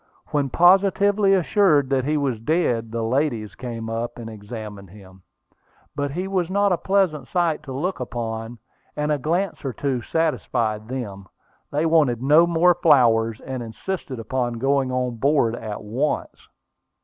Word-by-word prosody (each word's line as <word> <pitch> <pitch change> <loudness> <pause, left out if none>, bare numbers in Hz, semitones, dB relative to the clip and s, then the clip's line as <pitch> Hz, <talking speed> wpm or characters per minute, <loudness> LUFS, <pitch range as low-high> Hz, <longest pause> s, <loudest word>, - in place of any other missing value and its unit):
When 145 -2 0
positively 195 +4 +4
assured 170 -7 +3
that 130 -2 +1
he 150 +1 +1
was 135 -6 -1
dead, 115 -5 0
the 115 0 -2
ladies 115 -3 -1
came 115 -3 -6
up 115 +1 -4
and 115 -2 -7
examined 105 -2 -9
him. 95 -1 -15 0.7
But 145 0 -1
he 180 +7 -3
was 185 -3 -1
not 200 +1 +2
a 180 - +2
pleasant 185 -9 +1
sight 170 -4 0
to 145 -3 -9
look 155 +5 -2
upon, 115 -1 -5 0.4
and 150 0 -1
a 150 - +1
glance 170 +6 -1
or 135 -3 -3
two 135 -2 -2
satisfied 120 -9 -1
them. 105 -7 -6 0.4
They 150 +3 0
wanted 155 -8 +3
no 150 +6 +5
more 170 +1 +4
flowers, 120 -9 +3
and 130 -2 -5
insisted 130 +5 -5
upon 120 +2 -2
going 135 +2 0
on 125 -2 -2
board 135 -2 +2
at 110 -3 -6
once. 120 +8 -3
135 Hz, 155 wpm, -23 LUFS, 115-165 Hz, 0.7 s, no